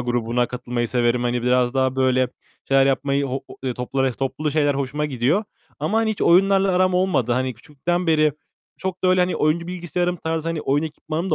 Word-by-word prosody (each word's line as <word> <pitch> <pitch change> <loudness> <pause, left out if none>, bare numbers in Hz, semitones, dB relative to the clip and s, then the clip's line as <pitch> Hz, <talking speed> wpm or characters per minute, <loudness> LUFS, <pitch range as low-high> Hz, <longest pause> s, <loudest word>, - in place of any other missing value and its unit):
grubuna 120 0 0
katılmayı 120 -1 -3
severim. 120 0 +1
Hani, 120 0 -1
biraz 125 0 +2
daha 130 0 +1
böyle 130 -1 +2 0.4
şeyler 135 0 +4
yapmayı, 140 +1 +1
ho 135 +1 -4
o - - -11
ııı, 125 -2 -1
topla 125 +2 -2
res 130 -3 0
toplu 150 +3 -2
şeyler 145 -1 +2
hoşuma 140 +2 -2
gidiyor. 140 - 0 0.4
Ama, 220 - +1
hani, 225 -1 +1
hiç 215 - -3
oyunlarla 195 +2 +4
aram 185 0 +2
olmadı. 180 -10 +1
Hani, 130 +1 -1
küçüklükten 160 +8 -3
beri 155 -2 +3 0.4
çok 185 0 -5
da - - +4
öyle, 185 0 +4
hani, 180 0 +1
oyuncu 155 +3 +1
bilgisayarım 180 0 -2
tarzı, 160 -1 -3
hani, 165 -2 -2
oyun 145 +2 +1
ekipmanım 160 +3 -4
da - - +3
145 Hz, 200 wpm, -22 LUFS, 125-175 Hz, 0.4 s, şeyler